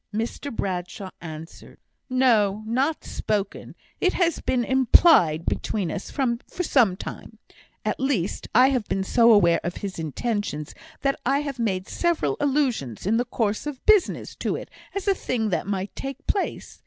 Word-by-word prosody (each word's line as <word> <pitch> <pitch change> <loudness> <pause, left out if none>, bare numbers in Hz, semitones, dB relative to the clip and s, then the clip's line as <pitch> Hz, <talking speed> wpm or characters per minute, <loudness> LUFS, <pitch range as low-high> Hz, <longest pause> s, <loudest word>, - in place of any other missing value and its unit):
Mr 230 +6 -3
Bradshaw 185 -2 -4
answered, 160 0 -10 0.3
"No, 220 -6 +3
not 265 +8 0
spoken. 205 -2 -3 0.2
It 370 - +2
has 340 -3 +1
been 245 -2 +1
implied 245 - +5
between 195 -6 -1
us 200 - -5
for 265 +5 -2
some 230 - +3
time. - - -8 0.5
At - - -1
least, 260 -9 -1
I 255 +3 +7
have 250 -6 -1
been 195 - -1
so 230 +4 +5
aware 175 -6 +5
of 175 +1 -3
his 190 -3 -5
intentions 160 - -3 0.3
that 275 0 0
I 275 +3 +2
have 280 -4 -5
made 190 -5 -1
several 345 -2 0
allusions, 260 - 0
in 220 +4 +2
the 245 - +1
course 225 +1 -1
of 280 -3 -7
business, 425 -4 +3
to - - -1
it, - - -8 0.2
as 395 0 -3
a 395 - +5
thing 235 - -2
that 185 - -1
might 195 -1 -3
take 275 +2 -6
place. 400 - -2
230 Hz, 160 wpm, -24 LUFS, 190-275 Hz, 0.5 s, I